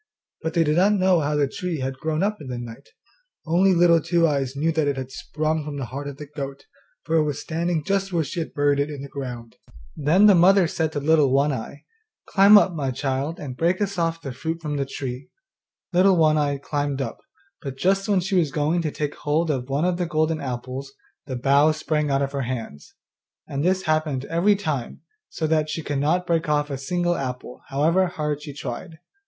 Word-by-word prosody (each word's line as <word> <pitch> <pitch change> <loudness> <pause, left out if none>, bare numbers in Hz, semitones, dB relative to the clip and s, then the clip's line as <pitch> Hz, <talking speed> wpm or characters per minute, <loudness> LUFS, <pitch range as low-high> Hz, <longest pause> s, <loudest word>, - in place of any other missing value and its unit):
But 160 +1 -3
they 165 - +4
did 150 0 +1
not 200 +4 +4
know 185 -3 +3
how 150 0 0
the 145 -1 +2
tree 175 +4 -4
had 130 0 -4
grown 155 +3 -1
up 210 0 -1
in 145 - -8
the 125 -1 -4
night; 120 +3 -9 0.6
only 180 +3 +3
Little 170 -1 +5
Two 170 +1 +2
eyes 140 -3 -1
knew 155 +4 +1
that 160 -2 0
it 140 -1 0
had 130 0 -5
sprung 155 +3 -2
from 145 -1 -6
the 135 - -3
heart 140 +4 -6
of 140 -1 -7
the 150 - -8
goat, 140 -1 -7 0.4
for 165 - +1
it 155 - +4
was 150 -2 -2
standing 165 0 -2
just 195 +2 -1
where 170 -2 +1
she 155 +4 -5
had 160 - -5
buried 145 -1 +2
it 145 +1 0
in 145 -2 -7
the - - -6
ground. 125 -5 -7 0.4
Then 160 +8 +4
the 210 - +8
mother 185 +1 +5
said 160 -1 -1
to 145 - -1
Little 150 -2 +3
One 140 +2 +3
eye, 130 +3 -7 0.4
'Climb 200 +2 +7
up, 190 -3 +3
my 145 -5 -2
child, 135 +5 -2
and 135 -4 -6
break 170 +6 +1
us 200 -3 -2
off 165 0 0
the 135 - -6
fruit 160 +6 -4
from 150 -3 -3
the 140 -1 -1
tree.' 135 -1 -6 0.6
Little 185 +1 +5
One 155 -2 +4
eye 145 -2 +1
climbed 145 0 -2
up, 135 - -4 0.4
but 135 -2 -6
just 195 +7 +1
when 195 -3 +3
she 195 +3 -4
was 165 -6 +2
going 155 +4 +1
to 160 - -1
take 150 0 -3
hold 155 +2 0
of 130 -2 -3
one 140 +5 0
of 180 -1 +1
the 175 -1 -1
golden 155 0 0
apples 130 +1 -5 0.3
the 130 - -4
bough 140 +5 +4
sprang 155 -1 -1
out 135 0 +2
of 135 - -2
her 140 -1 -2
hands; 120 - -6 0.5
and 140 +1 -3
this 185 +2 +1
happened 155 -5 0
every 175 +7 +2
time, 155 - -4 0.3
so 160 - -3
that 155 -1 +1
she 155 +1 -3
could 145 -2 -2
not 175 +6 +1
break 165 -3 0
off 145 -1 +1
a 135 - -2
single 175 +5 0
apple, 125 -3 -5
however 160 +7 +2
hard 150 -4 -3
she 150 -1 -7
tried. 150 +4 -7
150 Hz, 225 wpm, -23 LUFS, 140-170 Hz, 0.6 s, the